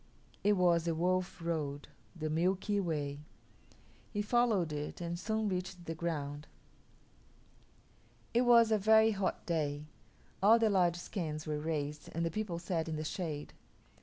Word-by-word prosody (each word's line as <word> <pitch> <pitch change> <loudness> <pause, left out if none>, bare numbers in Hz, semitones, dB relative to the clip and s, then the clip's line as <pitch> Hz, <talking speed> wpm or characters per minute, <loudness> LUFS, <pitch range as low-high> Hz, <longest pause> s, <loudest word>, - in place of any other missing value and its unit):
It 210 - +4
was 175 -3 +3
the 165 -1 0
Wolf 180 +2 0
Road 145 -4 -2 0.3
the 155 -2 -3
Milky 185 +5 +1
Way. 145 -6 -2 0.9
He 210 -1 -2
followed 210 -8 +2
it 150 0 -5
and 170 0 -4
soon 220 +1 -1
reached 185 -2 -4
the 165 - -3
ground. 150 -3 -4 1.9
It 240 - +4
was 235 -2 +6
a 215 - +4
very 220 +2 +5
hot 195 -2 -2
day. 150 -3 -1 0.6
All 215 +4 +7
the 225 -2 +3
lodge 175 -3 +3
skins 155 -4 -4
were 150 -1 -2
raised 150 -1 -3
and 165 +1 -1
the 165 - -1
people 210 -3 -3
sat 170 -2 -2
in 160 - -2
the 155 - -3
shade. 155 -2 -4
170 Hz, 150 wpm, -33 LUFS, 155-200 Hz, 1.9 s, All